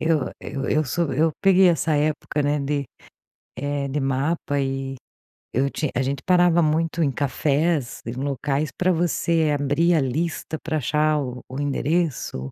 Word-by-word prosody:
eu 160 -4 +1
eu 135 -1 -4
eu 155 0 +2
sou 165 +5 -1
eu 160 +1 +2
peguei 190 -2 +6
essa 160 -2 +1
época, 150 0 0
né, 145 +1 +1
de, 140 0 -1 0.7
eh, 140 +1 -2
de 140 +2 -2
mapa 140 +2 -1
e 135 0 -2 0.6
eu 135 +3 +1
tinha 150 0 -2
a 130 - +2
gente 135 +1 -2
parava 175 -1 +4
muito 165 +1 +1
em 140 - +2
cafés 145 +1 0
e 115 - -3
locais 140 +2 -1
pra 185 0 +2
você 165 -2 +1
abrir 145 +5 +2
a 155 - +3
lista 160 +4 -2
pra 160 -1 -1
achar 150 +2 +1
o 125 -3 -5
o 130 +2 -5
endereço. 145 - -1
150 Hz, 165 wpm, -23 LUFS, 135-165 Hz, 0.7 s, peguei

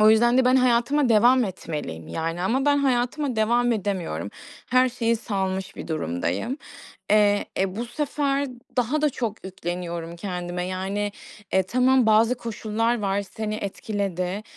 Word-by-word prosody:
O 215 0 +7
yüzden 240 +3 +4
de 260 - +4
ben 255 +1 +5
hayatıma 255 +2 +3
devam 240 +3 +5
etmeliyim, 150 - -5
yani. 165 +2 -3
Ama 260 +8 +1
ben 290 0 +4
hayatıma 260 0 0
devam 240 +2 +3
edemiyorum. 180 - -2 0.4
Her 255 +1 +5
şeyi 235 -2 0
salmış 190 -3 -3
bir - - -7
durumdayım. 100 - -2 0.5
Eee, 205 -1 +4
e, 190 +1 0
bu 235 +1 -3
sefer 285 +1 -1 0.3
daha 255 +5 +1
da 300 - +3
çok 225 -6 -4
yükleniyorum 175 -2 -5
kendime. 180 -1 -4
Yani, 195 +2 -2 0.4
e, 190 - +3
tamam 255 +4 +3
bazı 225 +3 +5
koşullar 230 0 -1
var, 200 0 0
seni 215 +2 -5
etkiledi. 200 -2 -3
215 Hz, 145 wpm, -24 LUFS, 185-245 Hz, 0.5 s, O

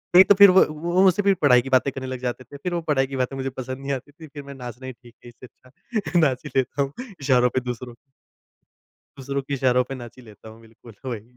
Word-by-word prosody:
नहीं, 185 - +10
तो 205 - +4
फिर 200 -1 +8
व 185 - +6
वो 175 +5 0
मुझसे 190 +2 +4
फ़िर 200 0 +3
पढ़ाई 125 -4 +5
की 135 - -8
बातें 130 +1 +2
करने 130 -1 -6
लग 130 -1 -5
जाते 125 0 -4
थे। 140 - -12
फिर 175 +5 -4
वो 170 - -1
पढ़ाई 135 -3 +1
की 135 - -7
बातें 130 +1 -2
मुझे 135 0 -3
पसंद 130 0 -7
नहीं 140 +1 -5
आती 135 +2 -5
थी। 160 +2 -13
फिर 145 0 -10
मैं, 140 0 -10
नाचना 125 0 -9
ही 130 - -6
ठीक 120 -1 -19
है, - - -10
इससे 120 +1 -15 0.2
अच्छा। 180 - -3
नाच 135 -5 +1
ही - - -6
लेता 130 +2 0
हूँ, 140 0 -2 0.3
इशारों 125 -2 +3
पे - - +3
दूसरों 125 0 -6 1.2
दूसरों 140 +1 -3
के 140 +1 -6
इशारों 125 -1 +2
पे 135 - -4
नाच 120 -1 -11
ही 125 - -14
लेता 110 0 -14
हूँ, 110 +1 -15
बिल्कुल, 115 +1 -17
वही। 120 -5 -4
130 Hz, 260 wpm, -23 LUFS, 125-145 Hz, 1.2 s, नहीं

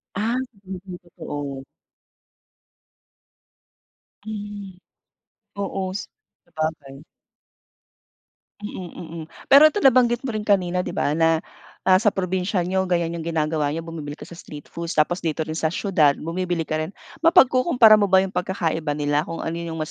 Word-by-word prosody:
Ah, 220 +5 0 0.3
hindi 185 0 -8
totoo. 145 -5 -7 2.6
Mm, 205 -3 -7 0.9
oo-s 195 0 -3 0.4
sabagay. 155 -3 -5 1.6
Mm, 190 -4 -6
mm 165 -1 -8 0.3
pero 280 +3 +9
'to 405 +7 +1
nabanggit 245 -2 +4
mo 265 - -3
rin 215 -1 -4
kanina 185 -3 +2
'di 180 - -3
ba - - 0
na, 165 +1 +2 0.4
ah, 185 0 +5
sa 210 0 +2
probinsya 185 0 -1
niyo 190 +2 0
ganyan 170 -2 0
yung 165 - -6
ginagawa 155 -2 0
niyo 165 - -3
bumibili 160 -3 -7
kayo - - -12
sa 170 - -11
street 150 -3 -11
foods 170 0 -5
tapos 155 +4 +2
dito 160 -2 -2
rin 155 +1 -4
sa 160 +1 0
siyudad 155 -8 +3
bumibili 175 +2 -2
ka 155 -1 -3
rin, 155 +5 -4 0.2
mapagkukumpara 255 - +6
mo 205 - +3
ba 190 -1 +5
yung 190 - -3
pagkakaiba 165 -5 -2
nila 145 +1 0
kung 165 - -5
ano 165 +1 -3
yung 165 -1 -5
mas 155 - -5
175 Hz, 145 wpm, -23 LUFS, 160-200 Hz, 2.6 s, pero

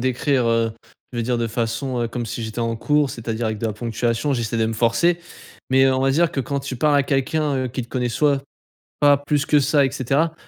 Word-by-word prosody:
d'écrire 130 0 +1
heu, 115 -1 +1 0.4
je 120 - -4
veux - - +1
dire 120 +1 0
de 115 - 0
façon 120 +3 -2
heu, 115 - -1
comme 120 0 -4
si 115 +1 -5
j'étais 110 +1 -6
en 115 0 0
cours, 150 +4 +1
c'est-à-dire 115 0 -3
avec 110 -1 -2
de 115 - -2
la 110 - -2
ponctuation, 115 +4 -1
j'essaie 115 -2 -2
de 110 - +2
me 115 - -2
forcer. 120 +10 +2 0.5
Mais 135 0 +5
heu, 135 0 +4
on 130 - 0
va 135 0 +2
dire 165 +4 +2
que 135 - -1
quand 140 +2 -2
tu 135 -1 -5
parles 145 +3 +2
à 140 - +4
quelqu'un, 145 +2 0
heu, 130 -1 -1
qui 125 +1 -4
te 115 - -12
connaît 125 -1 -1
soit 140 +3 +1 0.6
pas 145 -1 +6
plus 145 0 -1
que 150 - +4
ça 140 0 +3
et - - -2
cetera, 140 +5 0
130 Hz, 250 wpm, -22 LUFS, 115-140 Hz, 0.6 s, pas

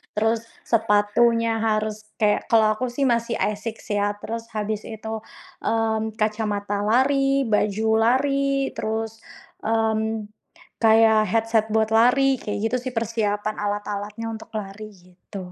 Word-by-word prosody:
terus 225 +1 0 0.2
sepatunya 225 +1 +2
harus 215 -1 -1
kayak, 210 -1 +1
kalau 220 -2 +4
aku 250 +4 -2
sih 245 +3 -2
masih 235 -2 +1
ASICS 215 +2 -3
ya, 205 - +2
terus 230 +2 -6
habis 215 0 -3
itu, 220 0 -5 0.4
mmm, 220 -1 -1
kacamata 210 -2 -1
lari, 270 +5 +2
baju 210 -1 0
lari 275 +3 +2
terus, 220 0 -3 0.4
mmm, 220 0 0 0.6
kayak 220 -1 +5
headset 225 +1 +1
buat 220 0 +2
lari, 255 +4 +4
kayak 205 -1 -4
gitu 255 - 0
sih 250 0 -6
persiapan 215 -2 -1
alat-alatnya 205 +1 -3
untuk 220 - -9
lari, 210 +1 -6
gitu. 180 +1 -11
220 Hz, 125 wpm, -23 LUFS, 210-230 Hz, 0.6 s, kayak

